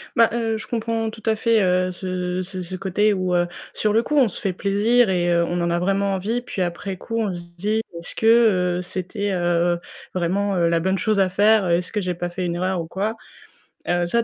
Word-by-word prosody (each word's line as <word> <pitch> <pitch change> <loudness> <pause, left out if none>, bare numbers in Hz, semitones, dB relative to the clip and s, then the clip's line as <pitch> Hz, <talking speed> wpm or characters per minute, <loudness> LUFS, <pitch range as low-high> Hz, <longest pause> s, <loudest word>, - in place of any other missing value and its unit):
Bah 230 -1 +5
heu, 225 -2 0
je 215 - -8
comprends 225 -1 -1
tout 220 0 -11
à 220 -1 +2
fait, 225 0 +2
heu, 185 -1 +2
ce 180 0 -3
ce 185 0 -5
ce 180 +1 -5
côté 195 +3 +1
où, 185 -2 0
heu, 175 0 +2 0.3
sur 210 -1 0
le 225 - +4
coup 300 - -2
on 265 -4 +6
se 195 - -6
fait 195 -3 -1
plaisir 210 +5 +2
et 175 -2 +1
heu, 170 0 +3
on 175 +1 -1
en 170 - 0
a 170 0 +1
vraiment 195 +2 +1
envie 220 +6 -2
puis 220 -5 -5
après 180 +2 -3
coup 230 +4 -5
on 210 -3 0
se 175 - -6 0.2
dit: 210 +5 0 0.2
«Est-ce 170 - -4
que, - - -2 0.5
heu, - - -2
c'était, 190 +3 -4
heu, 175 -1 +1 0.4
vraiment 190 +3 0
la 170 -1 +2
bonne 190 +3 0
chose 215 0 +1
à 190 -1 +3
faire? 205 +1 +4
Est-ce 170 +1 +1
que 210 - -1
j'ai 180 -1 -2
pas 175 +1 -3
fait 180 +1 -4
une 170 -1 -2
erreur 185 0 -1
ou 165 - -7
quoi?» 205 +6 -2 0.7
heu, 175 0 +1
ça, 235 +7 +1
190 Hz, 235 wpm, -22 LUFS, 175-215 Hz, 0.7 s, on